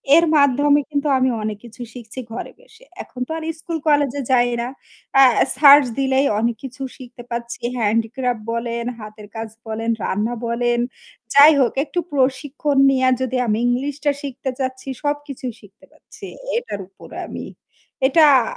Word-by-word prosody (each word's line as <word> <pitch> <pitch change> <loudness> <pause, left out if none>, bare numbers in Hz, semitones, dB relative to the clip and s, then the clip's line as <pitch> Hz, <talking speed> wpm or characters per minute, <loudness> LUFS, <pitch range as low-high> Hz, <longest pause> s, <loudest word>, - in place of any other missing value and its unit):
এর 335 - +6
মাধ্যমে 285 +1 +4
কিন্তু 290 0 -1
আমি 260 0 +2
অনেক 215 -1 -3
কিছু 235 +1 -12
শিখছি 240 0 -9
ঘরে 235 - -6
বসে। - - -20 0.2
এখন 250 - -13
তো - - -8
আর 320 - -6 0.2
স্কুল 330 0 -4
কলেজে 285 -2 +2
যাই 245 -1 +4
না। 240 - -3 0.5
অ্যা 270 -1 +8 0.3
সার্চ 285 -1 +8
দিলেই 265 +1 +2
অনেক 230 0 0
কিছু 270 +1 -9 0.2
শিখতে 245 -1 -11
পাচ্ছি। 235 0 -5 0.2
handicraft 230 +2 0
বলেন, 235 0 -3 0.2
হাতের 215 0 -10
কাজ 225 0 -5 0.2
বলেন, 225 +1 -3
রান্না 215 +5 -1
বলেন। 240 +1 0 0.5
যাই 285 +2 +9
হোক 250 - +2
একটু 350 +4 -3
প্রশিক্ষণ 280 +1 0
নিয়া 260 -1 +3
যদি 260 0 -1
আমি 215 -1 +1
ইংলিশটা 285 +4 0
শিখতে 270 -1 -5
চাচ্ছি 260 0 -4 0.2
সবকিছুই 290 -4 -3
শিখতে 205 +6 -19
পারছি 310 - -14 0.3
এটার 210 - -4
উপরে 195 - -13
আমি। - - -7 0.6
এটা 310 +4 +5 0.2
আ - - -1
260 Hz, 155 wpm, -20 LUFS, 235-285 Hz, 0.6 s, যাই